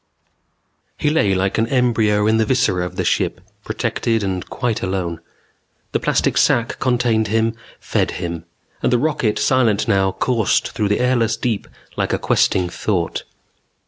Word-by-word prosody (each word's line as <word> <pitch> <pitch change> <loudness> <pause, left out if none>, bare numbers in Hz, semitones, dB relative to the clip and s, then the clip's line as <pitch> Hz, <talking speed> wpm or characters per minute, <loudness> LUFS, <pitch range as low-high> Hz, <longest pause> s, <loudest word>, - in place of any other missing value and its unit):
_ - - -48 0.9
He 150 - +1
lay 105 -11 +2
like 95 +3 0
an 115 - +2
embryo 115 -5 +2
in 110 +1 +3
the 110 - +2
viscera 95 -8 +1
of 90 - -11
the 90 - -1
ship, - - 0 0.2
protected 115 -2 -1
and 95 -2 -2
quite 120 -3 -2
alone. 90 -3 -2 0.7
The - - 0
plastic - - +1
sac 115 0 +2
contained 120 -3 +1
him, 115 +2 +1 0.3
fed - - 0
him; 85 -2 -5 0.4
and - - +1
the 125 - +4
rocket, 130 -5 0
silent 120 -6 +2
now, 95 -1 +2
coursed 115 -5 +1
through 110 -3 -1
the 105 - +1
airless 120 -3 +1
deep 115 -4 -2 0.3
like - - 0
a - - +2
questing 90 -1 +2
thought. 90 -1 -2
110 Hz, 160 wpm, -20 LUFS, 95-120 Hz, 0.9 s, the